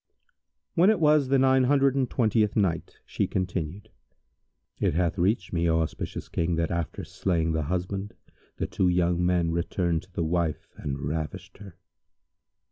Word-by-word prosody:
When 180 +4 +5
it 215 -4 +3
was 150 -3 +4
the 135 +1 +3
Nine 130 0 +4
Hundred 135 0 +3
and 135 -3 0
Twentieth 110 -3 +1
Night, 90 -6 0
She - - -1
continued: 95 +2 -3 0.9
It - - +1
hath 90 +1 0
reached 95 +1 +1
me, 85 0 +1
O 80 0 +3
auspicious 80 -1 -4
King, 85 +1 -1
that 85 0 -1
after 85 -2 -3
slaying 85 -4 -1
the 80 0 0
husband 90 +5 -3 0.4
the - - -1
two 95 - 0
young 90 0 +1
men 90 -2 +2
returned 85 -1 0
to 95 - -21
the 85 - -2
wife 85 -2 -1
and 70 -1 -4
ravished 75 +5 -5
her. 100 -4 -11
90 Hz, 160 wpm, -27 LUFS, 85-105 Hz, 0.9 s, When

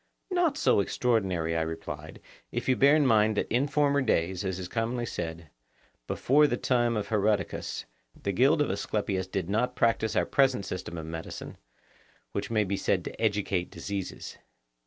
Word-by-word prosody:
Not 345 -5 +2
so - - +3
extraordinary, 95 -7 0
I 80 - +1
replied, 80 0 -6 0.3
if - - -3
you 130 - +4
bear 140 +3 +5
in 150 -2 +3
mind 110 -3 +4
that - - 0
in 130 +4 +2
former 145 -1 +2
days, 95 -5 0
as 95 -2 -2
is 90 -1 -5
commonly 120 +3 -2
said, 80 -7 -5 0.6
before 150 +3 +4
the 120 - -1
time 120 -3 +1
of 105 - -3
Herodicus, 105 -2 0 0.3
the 100 - -2
guild 140 - +4
of 145 - -2
Asclepius 100 -1 -2
did 95 -2 -3
not 125 +5 0
practise 115 -2 +1
our - - +3
present 130 -7 +2
system 90 -2 -5
of 80 - -5
medicine, 80 0 -7 0.8
which 100 - -3
may 110 -2 +2
be 100 0 -2
said - - 0
to - - -7
educate 100 -4 0
diseases. 100 -2 -6
105 Hz, 170 wpm, -28 LUFS, 95-125 Hz, 0.8 s, bear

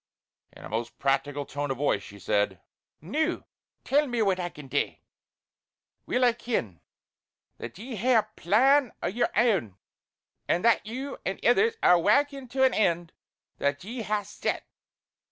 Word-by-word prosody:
In - - -12
a - - -8
most 115 +3 -4
practical 140 +1 0
tone 145 +1 -4
of 135 - -2
voice 135 -7 +1
she 100 +1 -12
said: 100 -1 0 0.4
"Noo 310 - -1 0.4
tell 295 +2 +2
me 240 -3 0
what 190 -2 +1
I 175 -1 -2
can 150 -4 -12
dae! - - -1 1.1
Weel 250 0 +2
I 240 - +4
ken, 120 - -3 0.8
that 120 +7 -8
ye 235 +3 -7
hae 250 +5 +3
a 220 - +5
plan 260 - +3
o' - - +1
yer 225 +7 0
ain; 195 - +2 0.7
an' 175 - +1
that 230 -2 +3
you 265 +5 -5
and 190 - -3
ithers 440 - +4
are 180 - +6
warkin' 275 - +2
to 265 +2 +1
an 260 -1 +4
end 170 -4 +1 0.5
that 140 +2 -1
ye 230 +5 -5
hae 210 -1 -1
set. 205 - -3
205 Hz, 160 wpm, -27 LUFS, -, 1.1 s, are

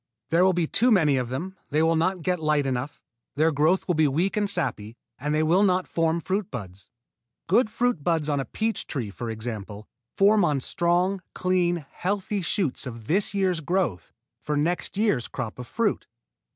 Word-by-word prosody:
There 170 +2 +4
will 190 0 +4
be 175 -1 +1
too 240 +10 +2
many 160 - +4
of 125 -2 -2
them, 170 +9 -4
they 150 +2 +2
will 165 0 +3
not 180 +2 0
get 180 0 0
light 150 -2 +1
enough, 130 +2 -3 0.4
their 155 +3 +3
growth 155 +6 +2
will 180 - +2
be 155 -2 +3
weak 165 +8 0
and 205 -1 0
sappy, 115 - -2 0.2
and 150 +3 -2
they 155 - +2
will 170 +5 +3
not 185 -2 +2
form 165 0 +1
fruit 190 +3 -2
buds. 100 -5 -8 0.6
Good 215 +5 +3
fruit 245 -8 0
buds 160 -3 +1
on 145 -2 0
a 135 - -2
peach 225 0 -2
tree, 120 -8 -4
for 120 +3 -6
example, 110 -2 -6 0.2
form 205 - +4
on 150 -5 +2
strong, 175 +7 +1
clean, 175 -3 +1
healthy 200 +1 -2
shoots 170 -6 -1
of 115 -3 -8
this 195 - 0
year's 185 -3 +1
growth 165 - -1 0.3
for 150 -1 -2
next 175 +5 -1
year's 205 - +1
crop 110 +2 -6
of 125 - -7
fruit. - - -1
165 Hz, 190 wpm, -25 LUFS, 135-185 Hz, 0.6 s, There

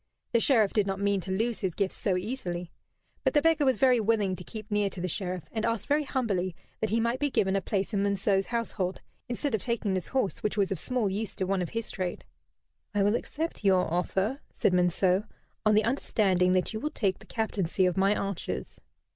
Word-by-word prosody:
The 235 - +4
Sheriff 225 -5 +4
did 210 -2 +2
not 195 0 -2
mean 200 -1 +1
to 190 - -5
lose 225 +4 0
his 190 -4 -2
gifts 195 -2 0
so 190 -3 0
easily. 180 -5 -4 0.5
But - - +1
the 295 - +6
beggar 325 -3 +4
was 260 -1 +3
very 255 -3 +5
willing 210 -3 +1
to 180 - -9
keep 215 +2 -9
near 205 -1 +2
to 190 - -8
the 180 - -1
Sheriff, 180 -1 -2
and 220 -1 -2
asked 230 -2 0
very 295 +1 +1
humbly 195 - -1 0.2
that 220 - 0
he 225 - +2
might 235 +2 0
be 290 - +1
given 195 -6 +1
a 195 - +1
place 200 +3 -2
in 200 - +1
Monceux's 200 -1 +1
household, 225 -6 -2 0.3
instead 245 +2 -2
of 220 - +1
taking 235 -4 -1
this 185 -3 -2
horse, 260 -8 -1
which 210 - -1
was 195 -2 +2
of 190 - -1
small 250 +1 0
use 200 +2 -3
to - - -2
one 190 0 0
of 175 - -2
his 230 -1 -3
trade. 185 -3 -4 0.7
"I 200 - +3
will 205 +1 +3
accept 320 +1 -4
your 185 -4 +3
offer," 195 +8 0
said 185 - +1
Monceux, 180 +2 +3 0.4
"on 215 - +5
the 215 - +4
understanding 195 -6 +2
that 185 +3 +1
you 220 - -3
will 300 - -2
take 195 - -1
the - - -15
captaincy 195 -4 0
of 180 - +1
my 195 +2 +3
archers." 200 -3 -4
200 Hz, 220 wpm, -28 LUFS, 185-230 Hz, 0.7 s, the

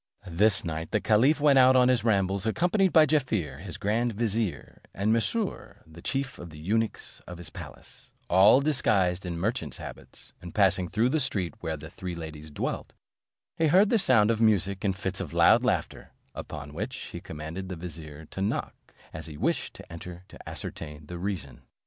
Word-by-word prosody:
This 95 +3 +2
night 80 0 -4
the 105 - +1
caliph 120 +10 +3
went 145 -2 +5
out 130 0 +7
on 125 -1 +6
his 125 -1 +2
rambles, 100 -2 +1
accompanied 180 - +2
by 160 -2 +7
Jaaffier 110 - 0
his 95 -1 -7
grand 115 +3 0
vizier, 105 - -2
and 105 +3 +1
Mesrour 195 - -2
the 80 +1 -14
chief 135 +4 -3
of 85 - -8
the 75 - -12
eunuchs 110 +8 -2
of 90 - -8
his 85 -1 -9
palace, - - -11 0.2
all 95 +9 +6
disguised 100 -11 +1
in 85 -1 -3
merchants' 85 - -2
habits; - - -11
and 85 -1 -10
passing 95 -3 +3
through 110 +7 +1
the 155 +4 +1
street 105 - -1
where 80 -2 -3
the 75 +1 -10
three 90 -2 -6
ladies 80 -2 -8
dwelt, 75 - -4 0.6
he 160 - +2
heard 190 +7 +5
the 230 - +4
sound 115 - +4
of 115 0 -1
music 100 -3 +2
and 95 -2 0
fits 95 -1 -3
of 85 -5 -5
loud 100 +8 +6
laughter; 100 -11 -2 0.2
upon 75 +1 -7
which - - -4 0.2
he - - -7
commanded 80 +5 -7
the 90 - -4
vizier, 80 -3 -9
to 95 - -7
knock, 100 - -1 0.4
as 80 0 -7
he 75 -2 -9
wished - - -1
to - - -12
enter 90 +1 -9
to - - -11
ascertain 75 0 -7
the 85 +3 -7
reason. 90 -8 -4
95 Hz, 185 wpm, -27 LUFS, 85-120 Hz, 0.6 s, out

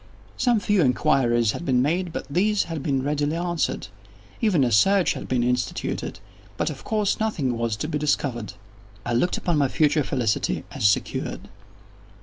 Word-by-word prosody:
Some 240 -3 +2
few 205 -2 +2
inquiries 125 -5 +2
had - - -6
been 130 -6 +2
made, 170 +7 0
but - - -5
these 200 +8 +1
had 165 -3 -5
been 135 -2 0
readily 145 +2 0
answered. 175 -1 -1 0.5
Even 195 - +3
a 120 - +1
search 195 - +4
had - - -7
been 125 -2 +1
instituted—but 125 -2 -3
of - - -10
course 210 -2 0
nothing 155 - -1
was 115 -1 -1
to 105 - -4
be 150 - -2
discovered. 125 -8 -1 0.5
I 120 - -1
looked 150 +10 +1
upon 170 -4 0
my 140 - +3
future 150 +2 +2
felicity 120 -6 -1
as 100 - +3
secured. 100 - -2
145 Hz, 160 wpm, -24 LUFS, 125-175 Hz, 0.5 s, search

